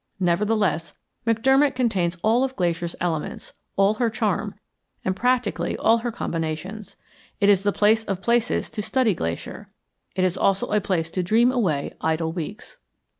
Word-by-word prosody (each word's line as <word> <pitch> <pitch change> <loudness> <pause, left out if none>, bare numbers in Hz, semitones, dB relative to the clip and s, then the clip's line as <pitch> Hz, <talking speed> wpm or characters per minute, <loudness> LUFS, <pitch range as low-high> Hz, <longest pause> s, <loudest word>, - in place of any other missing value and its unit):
Nevertheless, 190 -1 +1 0.3
McDermott 265 +5 +3
contains 190 -9 0
all 230 +4 +3
of 265 0 -2
Glacier's 170 -3 -1
elements, 165 -3 -3 0.2
all 195 +1 +4
her 230 +1 0
charm, 220 - -1 0.5
and 185 - 0
practically 245 +1 0
all 230 +1 +3
her 240 +1 -3
combinations. 170 +1 -4 0.4
It 200 -1 +4
is 195 -2 +5
the 205 +1 +1
place 215 +2 +3
of 195 -3 -2
places 235 +3 +1
to 210 - -3
study 245 0 +1
Glacier. 85 - -5 0.5
It 185 - +1
is 185 0 +1
also 195 0 +2
a 210 - +2
place 165 -4 -1
to 185 - -1
dream 225 +7 +3
away 180 - 0
idle 160 0 0
weeks. 200 - -7
205 Hz, 155 wpm, -24 LUFS, 175-230 Hz, 0.5 s, is